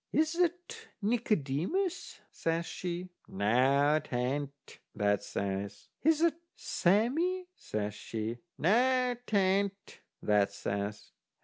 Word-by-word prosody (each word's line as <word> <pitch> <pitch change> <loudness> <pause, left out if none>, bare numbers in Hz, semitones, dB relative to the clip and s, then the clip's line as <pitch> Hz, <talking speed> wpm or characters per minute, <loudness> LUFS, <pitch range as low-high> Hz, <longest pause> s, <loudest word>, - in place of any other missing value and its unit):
"Is 315 +1 +2
that 355 +6 -1 0.2
Nicodemus?" 220 - 0
says 165 +1 -1
she. 180 +1 -4 0.2
"Noo, 135 +9 +3
'tain't," 140 0 -3 0.2
that 105 -1 +2
says. 100 0 -4
"Is 315 +1 +3
that 335 0 +3 0.2
Sammee?" 290 - +1
says 105 -1 -3
she. 110 +2 -4 0.2
"Noo, 250 +6 +3
'tain't," 200 0 +1 0.2
that 105 -1 +3
says. 100 +1 -4
170 Hz, 95 wpm, -31 LUFS, -, 0.2 s, Noo